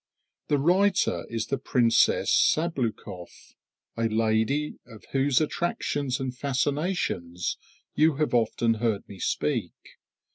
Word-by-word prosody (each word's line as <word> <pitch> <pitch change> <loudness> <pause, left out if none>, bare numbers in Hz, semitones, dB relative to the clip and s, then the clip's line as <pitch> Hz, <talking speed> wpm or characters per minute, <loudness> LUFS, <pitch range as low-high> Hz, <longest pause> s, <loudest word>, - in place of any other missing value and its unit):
The 145 - +2
writer 185 +8 +2
is 115 -1 -2
the 135 - -2
Princess 120 -4 +3
Sabloukoff, 125 - -1 0.4
a 115 0 0
lady 110 +7 0
of 110 -3 -14
whose 135 -1 +2
attractions 145 -4 -1
and 130 -1 -4
fascinations 140 - -1 0.4
you 155 -1 +3
have 150 -1 -1
often 115 0 +2
heard 110 -2 -1
me 100 - -11
speak. 115 - -1
130 Hz, 110 wpm, -26 LUFS, 110-150 Hz, 0.4 s, Princess